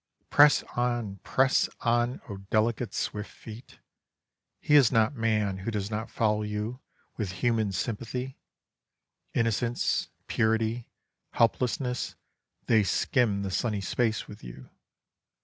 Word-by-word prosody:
Press 145 0 +6
on! 120 -5 -1
press 130 +7 +2
on! 120 +1 +1
oh 100 -4 -6
delicate, 110 +4 0
swift 105 0 -3
feet! 115 +2 -12 0.8
He 150 - 0
is 135 -6 +7
not 115 +2 +3
man 110 -5 0
who 95 - -4
does 105 -1 -3
not 110 +2 -3
follow 105 -1 +1
you 105 +4 -3 0.4
with 100 -5 -3
human 115 -4 +2
sympathy. 120 +6 -4 1.0
Innocence, 115 +1 0 0.2
purity, 110 +1 0 0.5
helplessness, 125 +2 0 0.5
they 110 -2 +4
skim 105 - +1
the 95 - -3
sunny 105 +2 0
space 110 +3 -1
with 105 - -12
you. 65 +1 -11
110 Hz, 115 wpm, -28 LUFS, 105-120 Hz, 1.0 s, is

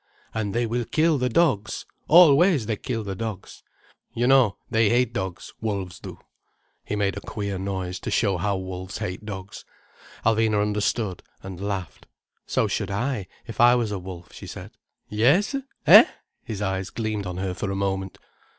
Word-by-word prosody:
"And 105 -2 -2
they 120 0 +2
will 120 +1 -1
kill 155 +1 +2
the 125 0 +1
dogs! 115 -8 +1 0.2
Always 165 - +6
they 110 - -1
kill 115 +1 -4
the 100 -2 -4
dogs. 105 -1 -6 0.5
You 120 - +1
know, 130 -6 +4
they 110 -1 +3
hate 120 0 +2
dogs, 95 -5 -5
wolves 100 -5 -3
do." - - -9 0.7
He - - -3
made 100 -2 0
a - - -5
queer 100 -3 -4
noise, 95 -1 -3
to - - -5
show 100 -5 +1
how 100 +2 0
wolves 95 0 -6
hate 90 +4 -5
dogs. 95 -1 -7 0.6
Alvina 110 -1 +3
understood, 105 -1 -1 0.2
and 95 -1 -8
laughed. 100 -4 -4 0.4
"So - - +1
should - - -2
I, 105 0 -2 0.2
if 115 -1 -3
I 120 +1 +7
was 115 -4 0
a 100 - -3
wolf," 90 -3 -10
she - - -10
said. - - -8 0.4
"Yes—eh?" 185 - +5 0.4
His 105 -3 -4
eyes 95 -1 -2
gleamed 110 -3 -3
on 90 0 -5
her 95 -1 -2
for 100 +2 -4
a 95 - -2
moment. 95 -1 -2
105 Hz, 170 wpm, -24 LUFS, 95-120 Hz, 0.7 s, I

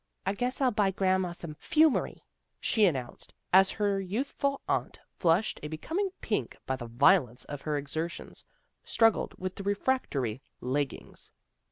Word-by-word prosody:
" - - -46
I 195 - +1
guess 250 +4 -2
I'll 260 -2 +4
buy 205 -3 +2
grandma 190 -1 +1
some 170 -2 -7
'fumery," 310 -2 +2 0.4
she 215 -2 +3
announced, 130 -8 -4 0.2
as 190 +1 +7
her 200 -2 0
youthful 270 +8 -1
aunt, - - -1 0.2
flushed 175 +4 +2
a 150 - -4
becoming 325 - -2
pink - - -2
by 130 - 0
the 120 -2 -7
violence 125 - +3
of 145 -1 -6
her 150 -2 -1
exer 155 +4 -3
tions, - - -10 0.4
struggled 225 -2 +2
with 185 0 -4
the - - -4
refractory 195 - 0 0.2
leggings. 135 +2 -3
185 Hz, 155 wpm, -29 LUFS, 145-215 Hz, 0.4 s, as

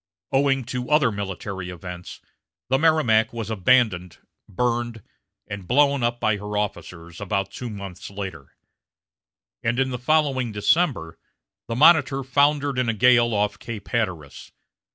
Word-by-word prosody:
Owing 135 -1 +2
to 125 +1 -5
other 150 -5 +4
military 95 -2 -5
events, 90 0 -9 0.5
the 135 +1 +2
Merrimac 150 -9 +3
was 115 -2 -5
abandoned, 100 -4 +2 0.3
burned, 120 0 -2 0.4
and 100 -3 -8
blown 140 +1 +3
up 120 0 0
by 110 -2 +1
her 105 +1 -5
officers 85 -3 -5
about 95 -1 -2
two 125 - -6
months 100 -4 -8
later; 100 -1 -7 1.1
and 120 +1 -1
in 130 0 +1
the 125 - -4
following 135 -3 +1
December, 105 - 0 0.5
the 115 - -3
Monitor 140 -1 +5
foundered 140 +1 +2
in 125 -2 +1
a 115 - 0
gale 120 +1 +4
off 105 -1 -1
Cape 110 -4 -8
Hatteras. 90 - -3
115 Hz, 135 wpm, -23 LUFS, 100-130 Hz, 1.1 s, Monitor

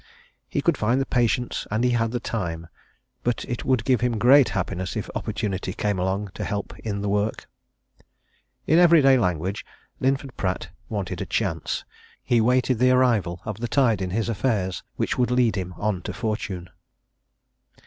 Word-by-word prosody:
He - - -1
could - - +2
find 115 +5 +2
the 135 - 0
patience, 120 -1 0
and 110 +3 0
he 125 - +3
had 115 -1 +1
the 120 +1 -2
time 85 -8 -3 0.6
but 120 0 -1
it 120 - -4
would 125 -4 +1
give 130 -3 +2
him 120 -2 +1
great 130 +4 +6
happiness 95 -2 -3
if - - -4
opportunity 95 -2 -3
came 105 -2 -1
along 95 +2 -1
to - - -5
help 100 -1 -3
in 100 -2 -3
the 105 - -2
work. 105 +2 -1 1.2
In 160 +3 +4
everyday 155 -7 +6
language, 90 0 -1 0.4
Linford 135 0 0
Pratt 95 -1 -2 0.2
wanted 100 -4 -3
a - - -4
chance - - -2 0.4
he 120 -2 +3
waited 125 +1 +2
the 125 +1 +5
arrival 115 -9 +2
of 110 -2 -5
the 120 - -2
tide 115 -6 +2
in 95 - -2
his 110 +4 -1
affairs 105 -4 -1
which - - -1
would 125 - +3
lead 125 -4 +2
him 90 -2 -4
on 105 -4 -1
to - - -5
fortune. 105 -6 -4
110 Hz, 170 wpm, -24 LUFS, 95-125 Hz, 1.2 s, great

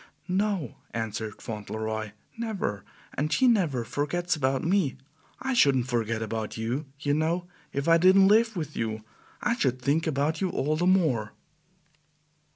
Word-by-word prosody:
"No," 190 - -1 0.2
answered 110 -1 -4
Fauntleroy, 110 0 -4 0.2
"never; 210 - -3 0.3
and 150 +3 -1
she 255 - +4
never 170 - +2
forgets 170 +8 -1
about 135 -2 0
me. 170 -7 +1 0.4
I 265 0 -1
shouldn't 140 - +4
forget 115 -2 0
about 110 0 -4
YOU, 120 +7 -2
you 145 -1 0
know, 165 +4 0 0.3
if 140 +1 -2
I 165 0 +6
didn't 190 +2 +6
live 225 +2 +4
with 155 -4 -4
you. 110 -1 -3 0.4
I 235 - +2
should 130 - 0
think 145 +6 +1
about 155 +3 0
you 190 - +1
all 155 -2 0
the 175 +3 +1
more." 150 - +2
145 Hz, 150 wpm, -27 LUFS, 115-180 Hz, 0.4 s, I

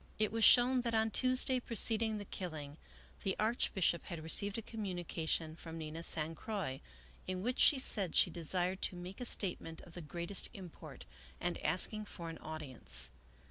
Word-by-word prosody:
It 215 -1 +1
was 225 0 -1
shown 250 +2 +7
that 235 -2 -1
on 220 0 +2
Tuesday 255 +1 +2
preceding 225 -1 +1
the 205 - -6
killing 155 -7 -6 0.4
the 190 - -1
Archbishop 210 -6 +1
had 170 -4 -6
received 200 +6 +1
a 225 - -5
communication 175 -7 -3
from 165 -1 -9
Nina 160 +1 -6
San 160 -1 +3
Croix, 165 - -4 0.5
in 185 0 -3
which 250 +3 -2
she 290 - +7
said 205 - +1
she - - +5
desired 180 +3 -1
to - - 0
make 180 +5 -8
a 245 - -2
statement 175 -6 -2
of 170 - -15
the 175 - -7
greatest 170 +5 0
import, 185 -5 -10 0.3
and 175 0 -2
asking 200 +7 +3
for 170 -4 -8
an 165 - -8
audience. 130 - -1
185 Hz, 170 wpm, -35 LUFS, 165-220 Hz, 0.5 s, shown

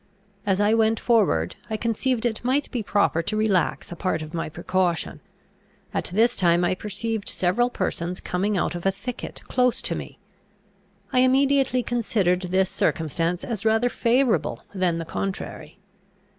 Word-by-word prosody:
As 195 -1 +2
I 205 +1 +3
went 225 0 +3
forward, 195 - +2
I 220 - -1
conceived 230 +2 -1
it 230 -2 -1
might 265 +4 0
be 245 - -2
proper 200 -5 +1
to 215 +6 -3
relax 210 -5 +1
a - - -5
part 165 -3 -1
of 155 +1 -10
my 165 -2 -2
precaution. 175 +1 -1 0.7
At - - -1
this 230 +6 +2
time 175 -1 +3
I 175 - +2
perceived 210 +2 -3
several 215 +7 +1
persons 180 -5 -3
coming 195 +3 -1
out 175 - 0
of 175 +2 -3
a - - +4
thicket 230 +5 -7
close 250 -1 +2
to - - +1
me. - - -7 1.0
I 255 - +4
immediately 265 0 +3
considered 205 -7 +1
this 190 +1 +3
circumstance 165 +2 0
as 220 -5 -4
rather 225 +2 +3
favourable 245 +1 +1
than 180 -3 +1
the 165 - -4
contrary. 185 -1 -5
205 Hz, 155 wpm, -24 LUFS, 180-235 Hz, 1.0 s, a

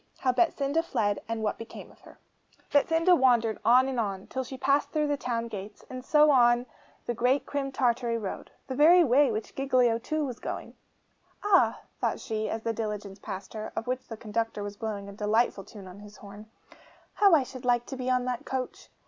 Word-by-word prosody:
HOW 255 - +1
BETSINDA 285 +1 +1
FLED, 205 -11 -1
AND 225 -1 -3
WHAT 210 - -1
BECAME 230 - -10
OF - - -22
HER - - -16 0.5
Betsinda 325 +5 +4
wandered 240 -6 +3
on 250 +4 +5
and 260 -2 -2
on, 195 -3 -3
till 260 - -4
she 260 +1 -8
passed 275 +2 +1
through 305 -1 0
the 290 -1 0
town 235 -3 -3
gates, 205 -1 -8
and 255 0 -6
so 300 +2 +5
on 240 -2 +4 0.4
the 240 - -1
great 250 +4 +1
Crim 275 -1 -3
Tartary 240 -2 0
road, 205 -4 -6 0.2
the 265 - -5
very 330 +6 +6
way 280 +1 +4
on 235 - -1
which 215 +1 -5
Giglio 250 -4 +2
too 310 +5 -2
was 250 -3 -6
going. - - -6 0.7
'Ah!' 410 -2 +3 0.2
thought - - -1
she, 220 -2 -3
as 225 0 -4
the 230 - -1
diligence 210 -3 -5
passed 195 -1 -7
her, 215 -1 -6
of - - -3
which 255 +1 -3
the 225 - -7
conductor 225 -1 -3
was 205 0 -6
blowing 205 -2 -5
a - - -8
delightful 210 +1 0
tune 200 0 -12
on 185 +2 -11
his 210 0 -13
horn, 205 +1 -12 0.6
'how 400 -5 +5
I 290 - +3
should 255 0 -10
like 240 -1 +2
to 270 - -7
be 255 -1 -3
on 250 -1 +1
that 250 -1 -3
coach! 260 -1 -5
240 Hz, 210 wpm, -28 LUFS, 215-270 Hz, 0.7 s, very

